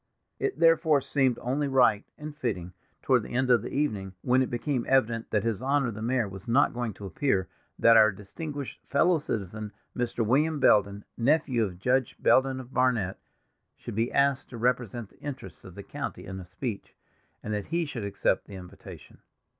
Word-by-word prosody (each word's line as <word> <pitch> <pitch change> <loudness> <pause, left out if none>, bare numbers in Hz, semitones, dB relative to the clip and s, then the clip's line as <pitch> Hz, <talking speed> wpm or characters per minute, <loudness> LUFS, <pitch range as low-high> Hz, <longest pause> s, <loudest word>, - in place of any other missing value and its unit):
It 405 - -1
therefore 165 -2 +4
seemed 130 -3 +1
only 140 +4 0
right 125 -6 +3
and 150 0 -8
fitting 95 - -3 0.3
toward - - +3
the - - -7
end 130 0 +2
of 120 -3 +5
the - - -6
evening, 105 -10 -2
when 130 +1 +3
it 130 - 0
became 125 +1 -1
evident 115 -3 +2
that 105 -2 0
his 115 -2 -1
Honor 135 -1 +1
the 110 0 -8
Mayor 120 -1 0
was 95 0 -10
not 125 +5 +3
going 120 -2 -2
to 100 - -9
appear, 95 - 0 0.3
that 115 0 +6
our 110 -1 +7
distinguished 140 +9 -7
fellow 160 +5 +3
citizen, 105 -5 -4 0.2
Mr. 120 -2 -1
William 150 +6 +2
Belden, 100 -4 +3
nephew 130 -1 +2
of 95 -4 -4
Judge 125 +6 +1
Belden 130 0 +3
of 130 0 -11
Barnet, 120 -7 +1 0.6
should - - -8
be 115 +3 0
asked 140 -1 +1
to 120 - -8
represent 120 -2 -1
the - - -24
interests 145 -3 -8
of - - -12
the - - -8
county - - -6
in 95 0 -6
a 90 - -9
speech, 100 +4 -6 0.5
and 110 - -3
that 105 -1 -3
he 170 +1 0
should 125 -7 -5
accept 100 0 0
the 100 - -9
invitation. 90 -1 -12
120 Hz, 185 wpm, -28 LUFS, 105-135 Hz, 0.6 s, our